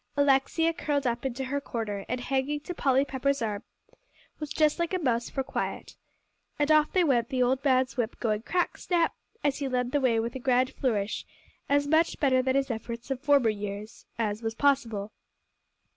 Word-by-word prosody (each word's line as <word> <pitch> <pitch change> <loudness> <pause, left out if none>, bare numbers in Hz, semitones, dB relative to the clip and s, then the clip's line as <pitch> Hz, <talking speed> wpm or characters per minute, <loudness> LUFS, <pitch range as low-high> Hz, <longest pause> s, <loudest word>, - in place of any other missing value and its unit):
Alexia 285 +4 +3
curled 290 -4 -1
up 240 +2 0
into 265 +1 -4
her 280 +2 -2
corner, 210 -6 -4
and 250 0 -2
hanging 270 +3 -1
to 300 +5 -6
Polly 270 -4 +2
Pepper's 280 +1 0
arm, 210 -4 -2 0.8
was 300 -2 -5
just 305 +2 +2
like 340 +2 0
a - - +2
mouse 240 -8 0
for 270 - -2
quiet. - - -4 0.6
And 295 +1 +2
off 305 -1 +5
they 370 - +3
went; 240 -7 +2
the 255 -1 +1
old 260 +2 +1
man's 260 -1 +2
whip 240 -1 -2
going 215 -3 0
crack 355 +8 -1
snap! 340 -2 +1 0.3
as 285 -1 +1
he 280 - -1
led 250 -1 -1
the 290 - +1
way 235 -4 +3
with 230 +1 -2
a 260 - -5
grand 255 0 +2
flourish, 215 -6 -1 0.5
as 285 0 +3
much 320 +3 +2
better 260 -3 +3
than 260 +1 0
his 275 -1 +1
efforts 235 +3 -6
of 265 -1 -2
former 285 -5 +4
years, 205 +1 -7
as 215 -1 -1
was 225 -1 -3
possible! 230 -7 +1
260 Hz, 190 wpm, -28 LUFS, 235-285 Hz, 0.8 s, off